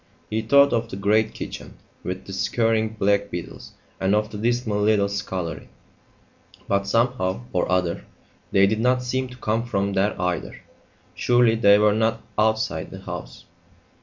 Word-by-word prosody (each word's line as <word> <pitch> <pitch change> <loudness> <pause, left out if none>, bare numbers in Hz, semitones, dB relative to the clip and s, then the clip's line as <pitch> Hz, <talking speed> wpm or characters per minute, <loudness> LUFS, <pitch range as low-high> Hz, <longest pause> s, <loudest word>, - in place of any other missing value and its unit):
He 110 +1 0
thought 140 +5 +5
of 115 -1 0
the - - -6
great 105 +2 +1
kitchen, - - -7 0.3
with 95 +1 -5
the 95 - -8
scurrying 110 +2 0
black 100 0 +1
beetles, 90 -1 -8 0.3
and 95 +2 +2
of 105 0 0
the 105 - -6
dismal 115 -2 0
little 105 -1 +3
scullery; 95 -4 -4 1.0
but, 100 0 0
somehow 115 - 0
or - - 0
other, 90 -2 0 0.5
they 100 0 +5
did 110 +2 0
not 125 +2 +2
seem 130 +1 -1
to 125 0 -12
come 115 -1 -1
from 100 -4 -1
there 95 +1 0
either. 90 -1 -2 0.5
Surely 120 -2 +3
they 100 -3 +5
were 105 0 +4
not 110 +1 0 0.2
outside 110 +1 0
the - - -10
house! - - -8
105 Hz, 160 wpm, -23 LUFS, 100-115 Hz, 1.0 s, thought